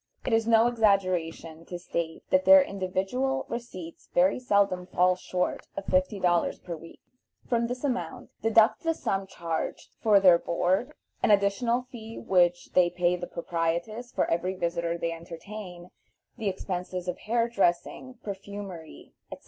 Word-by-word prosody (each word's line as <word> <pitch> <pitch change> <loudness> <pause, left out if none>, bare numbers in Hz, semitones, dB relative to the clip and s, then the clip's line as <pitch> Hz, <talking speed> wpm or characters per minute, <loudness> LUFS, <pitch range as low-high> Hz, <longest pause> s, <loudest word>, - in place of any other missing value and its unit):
It 245 - 0
is 225 0 +2
no 225 0 +5
exaggeration 185 -8 +1
to 175 - -6
state 170 -2 -4
that 280 0 +4
their 285 0 +8
individual 200 +7 -2
receipts 185 -8 -7
very 185 +6 +4
seldom 200 -6 +1
fall 180 0 +3
short 180 0 -3
of 195 - -4
fifty 185 +2 +1
dollars 175 -2 +2
per 170 - -7
week. 165 +1 -13 0.5
From 235 -1 +1
this 245 +2 -5
amount 245 - -3
deduct 225 +1 +4
the 330 -1 0
sum 195 -7 -2
charged 165 -3 -4
for 210 -3 +5
their 180 -3 +6
board, 185 - 0 0.3
an - - +2
additional 210 +5 +2
fee 225 -2 -9
which 175 -2 +2
they 180 -1 +5
pay 175 0 +1
the 175 0 -6
proprietress 170 +8 -3
for - - +1
every 180 +3 -1
visitor 170 -1 -1
they 170 0 -2
entertain, 175 +2 -9 0.4
the 220 -4 -1
expenses 185 -1 -4
of 180 - -3
hair 230 +1 +1
dressing, 235 +4 -1
perfumery, 195 -4 -8 0.2
etc. - - -7
190 Hz, 150 wpm, -27 LUFS, 175-225 Hz, 0.5 s, their